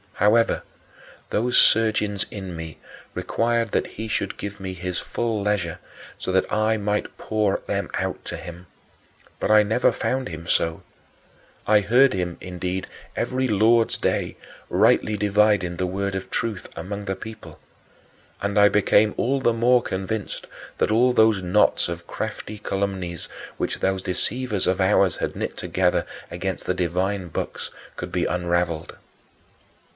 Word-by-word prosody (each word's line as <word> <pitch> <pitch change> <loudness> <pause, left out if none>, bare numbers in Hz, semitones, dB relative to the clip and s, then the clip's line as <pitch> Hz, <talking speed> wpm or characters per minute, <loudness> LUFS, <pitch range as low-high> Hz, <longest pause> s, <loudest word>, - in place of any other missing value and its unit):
However, 110 +3 +3 0.7
those 120 +3 +2
surgings 110 -2 +3
in 95 -4 -6
me 80 -2 -7 0.4
required 115 -1 0
that - - +1
he 110 +1 -6
should 100 -2 -2
give 100 0 -6
me 95 -1 -5
his 90 0 -3
full 115 -3 -2
leisure 100 -5 -1 0.4
so - - -3
that 95 0 +1
I 110 +1 +2
might 105 0 -2
pour 105 -3 0
them - - -1
out - - -2
to - - -4
him; 85 +1 -9 0.7
but - - -1
I 105 0 +7
never 110 +4 +3
found 130 -4 -1
him 80 0 -7
so. 80 -1 +1 0.8
I 105 -1 +5
heard 125 +5 +5
him, 90 -3 -2
indeed, 90 +1 -3 0.3
every 130 0 0
Lord's 115 +1 +3
Day, - - -1 0.3
"rightly 105 -1 +3
dividing 105 -3 +2
the 90 - 0
word 100 +2 -2
of 95 0 -4
truth" 110 -5 -2
among 100 +4 -5
the 95 - -2
people. 105 -5 -10 0.8
And 100 +1 +1
I 105 0 +7
became 105 +1 +4
all 135 +3 +1
the 120 -3 +2
more 120 +2 +4
convinced 100 +1 -4 0.3
that - - +1
all 125 +3 +4
those 110 -4 +4
knots 90 -1 +3
of 85 0 -6
crafty 105 -1 -5
calumnies 95 -4 -2 0.3
which - - -2
those 95 0 0
deceivers 105 +3 -1
of 95 +1 +1
ours 95 -1 +3
had - - -2
knit - - -4
together - - +1 0.2
against 95 +2 -4
the 90 - 0
divine 90 +2 -1
books - - -4 0.3
could - - -6
be - - 0
unraveled. 85 -2 -1
100 Hz, 150 wpm, -24 LUFS, 90-110 Hz, 0.8 s, I